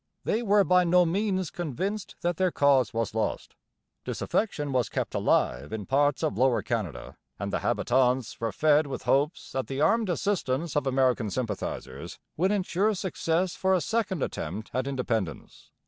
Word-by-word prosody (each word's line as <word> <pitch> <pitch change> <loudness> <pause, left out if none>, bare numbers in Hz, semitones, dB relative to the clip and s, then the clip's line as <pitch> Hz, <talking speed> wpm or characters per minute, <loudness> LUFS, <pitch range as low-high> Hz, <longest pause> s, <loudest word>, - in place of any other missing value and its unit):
They 220 - 0
were 205 -3 +4
by 180 -1 +4
no 180 +1 +4
means 190 0 0
convinced 190 - -4
that 175 -1 -1
their 185 -1 +2
cause 140 -8 +3
was 115 -2 -2
lost. 110 0 -2 0.5
Disaffection 150 -10 -2
was 125 -2 +1
kept - - -3
alive 60 +4 +1
in 110 -2 -4
parts 145 0 +2
of 100 - -1
Lower 130 -2 +3
Canada 105 - -4 0.2
and - - -4
the - - +1
habitants 125 -1 +1
were 115 -1 -1
fed 150 +2 +3
with 135 - -5
hopes 145 +4 0
that 130 -1 -2
the 135 0 -4
armed 225 +6 +3
assistance 170 -5 -1
of 145 -2 +1
American 130 -4 +2
sympathizers 110 -2 -4 0.2
would 185 +5 +2
ensure 205 +1 +1
success 180 -2 -1
for 190 0 +2
a - - +2
second 205 - -1
attempt 95 +7 -5
at 130 +1 -1
independence. 115 - -3
145 Hz, 165 wpm, -27 LUFS, 125-185 Hz, 0.5 s, were